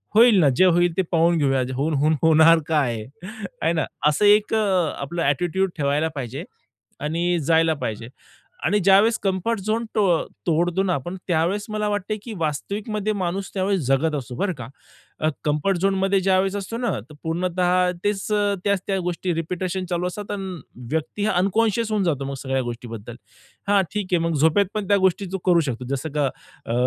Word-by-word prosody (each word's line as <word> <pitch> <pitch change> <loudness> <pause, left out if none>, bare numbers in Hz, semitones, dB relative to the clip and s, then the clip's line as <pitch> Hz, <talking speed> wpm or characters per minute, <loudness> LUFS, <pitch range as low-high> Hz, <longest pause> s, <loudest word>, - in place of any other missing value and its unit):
होईल 225 -2 +7
ना 150 - +5
जे 185 - +6
होईल 175 -1 +3
ते - - +4
पाहून 170 0 +3
घेऊया 135 -3 +2
होऊन-होऊन 150 +2 +1
होणार 160 +1 +6
काय 125 -9 0 0.6
आहे 165 +2 +2
ना 160 -3 0 0.2
असा 150 +7 +2
एक 210 +1 +4
आपला 175 -6 0
ॲटिट्यूड 175 +6 +1
ठेवायला 145 +2 +1
पाहिजे.आणि 150 - -4
जायला 160 +1 +3
पाहिजे. 115 +2 -5 0.6
आणि 205 +7 +3
ज्यावेळेस 200 +4 +5
कम्फर्ट 195 +3 0
झोन 220 +3 -1
तो 215 - +3 0.4
तोडतो 175 +3 +1
ना 185 - +1
आपण 175 +7 -4
त्यावेळेस 180 +4 0
मला 215 0 -1
वाटते 205 +1 -2
की 230 - -7
वास्तविकमध्ये 205 +7 -2
माणूस 190 0 -2
त्यावेळेस 195 0 0
जगत 150 +4 +2
असतो 125 -3 -5
बरं 195 +4 -1
का. 125 -7 -8 0.8
कम्फर्ट 150 +6 +1
झोनमध्ये 195 +1 +1
ज्यावेळेस 190 +1 +2
असतो 205 +3 -4
ना 240 -1 -1 0.2
तर 150 - -13
पूर्णत: 175 +2 -2 0.4
तेच 205 -1 -1 0.4
त्याच 200 -2 +1
त्या 195 -1 0
गोष्टी 180 0 -2
रिपिटेशन 180 +3 -3
चालू 175 0 -1
असतात 205 +3 -6
आणि 190 -6 -5 0.3
व्यक्ती 160 +6 -2
हा 215 - +2
अनकॉन्शियस 220 +4 +1
होऊन 210 -2 +1
जातो 145 -6 -1
मग 140 - -4
सगळ्या 135 -1 0
गोष्टींबद्दल. 120 -2 -7 0.5
हा 205 -1 +5
ठीक 205 -2 -2
आहे - - +5
मग 165 - -1
झोपेत 160 +7 +4
पण 210 -3 -3
त्या 200 - +4
गोष्टी 190 +1 +1
तो - - 0
करू 175 -2 +5
शकतो 125 0 -5
जसं 155 +4 -5
की - - +1
अ, 135 -4 -4
175 Hz, 170 wpm, -23 LUFS, 150-200 Hz, 0.8 s, होईल